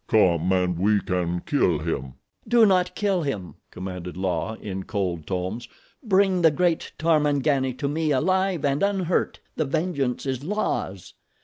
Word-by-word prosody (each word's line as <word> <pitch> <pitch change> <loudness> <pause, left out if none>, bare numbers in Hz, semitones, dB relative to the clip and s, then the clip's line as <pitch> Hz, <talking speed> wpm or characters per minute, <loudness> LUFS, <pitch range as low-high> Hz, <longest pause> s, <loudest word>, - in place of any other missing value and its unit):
"Come 90 -4 +3
and 90 -2 +1
we 105 +2 +3
can 90 -2 -2
kill 90 - +1
him." 70 -5 -4 0.3
"Do 235 -2 +6
not 185 -3 +2
kill 195 -3 +1
him," 105 - -4 0.2
commanded 90 -1 -7
La 95 +4 -1
in 95 -3 -6
cold 90 -7 -3
tones. 95 +6 -3 0.3
"Bring 195 -5 +2
the 165 - +7
great 170 +2 0
Tarmangani 145 -4 +2
to 140 - -2
me 155 +2 -1
alive 185 +4 +1
and 140 0 +1
unhurt. 190 -3 0 0.2
The 155 - +1
vengeance 140 -4 -1
is 135 -1 -2
La's. 150 - -3
135 Hz, 145 wpm, -24 LUFS, -, 0.3 s, the